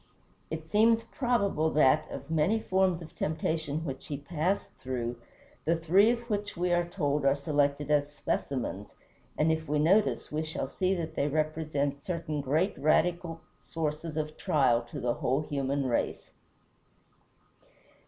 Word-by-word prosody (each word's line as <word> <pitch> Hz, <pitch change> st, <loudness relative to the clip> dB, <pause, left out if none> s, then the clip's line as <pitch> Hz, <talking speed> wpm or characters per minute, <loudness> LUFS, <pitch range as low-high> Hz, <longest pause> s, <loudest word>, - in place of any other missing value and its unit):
It 160 Hz, 0 st, -5 dB
seems 225 Hz, +5 st, +4 dB
probable 205 Hz, -, +1 dB
that, 155 Hz, +1 st, +4 dB
of 140 Hz, +3 st, -7 dB
many 165 Hz, +8 st, +2 dB
forms 185 Hz, -4 st, +1 dB
of 160 Hz, +1 st, -12 dB
temptation 160 Hz, 0 st, -2 dB
which 135 Hz, -3 st, -6 dB
he 145 Hz, -, -3 dB
passed 170 Hz, +6 st, -1 dB
through, 120 Hz, -2 st, -3 dB, 0.5 s
the 165 Hz, -, +2 dB
three 175 Hz, +6 st, +4 dB
of 235 Hz, 0 st, +1 dB
which 205 Hz, -4 st, -3 dB
we 175 Hz, 0 st, +1 dB
are 175 Hz, 0 st, +2 dB
told 150 Hz, -5 st, 0 dB
are 135 Hz, 0 st, +4 dB
selected 145 Hz, 0 st, 0 dB
as 145 Hz, -1 st, +2 dB
specimens, 125 Hz, -8 st, -3 dB, 0.4 s
and 155 Hz, +1 st, +3 dB
if 160 Hz, -1 st, -2 dB
we 150 Hz, -, +2 dB
notice 190 Hz, +8 st, +2 dB
we 155 Hz, +1 st, -1 dB
shall 155 Hz, -3 st, -3 dB
see 185 Hz, +6 st, 0 dB
that 170 Hz, -3 st, -4 dB
they 140 Hz, -, 0 dB
represent 150 Hz, -2 st, -1 dB
certain 165 Hz, -4 st, -3 dB
great 155 Hz, +8 st, +1 dB
radical 165 Hz, +3 st, +1 dB, 0.2 s
sources 155 Hz, 0 st, -4 dB
of 155 Hz, 0 st, -3 dB
trial 125 Hz, -5 st, +3 dB
to -, -, -6 dB
the 120 Hz, -1 st, 0 dB
whole 130 Hz, +5 st, 0 dB
human 140 Hz, -2 st, -1 dB
race. 120 Hz, -2 st, -1 dB
155 Hz, 150 wpm, -29 LUFS, 145-175 Hz, 0.5 s, seems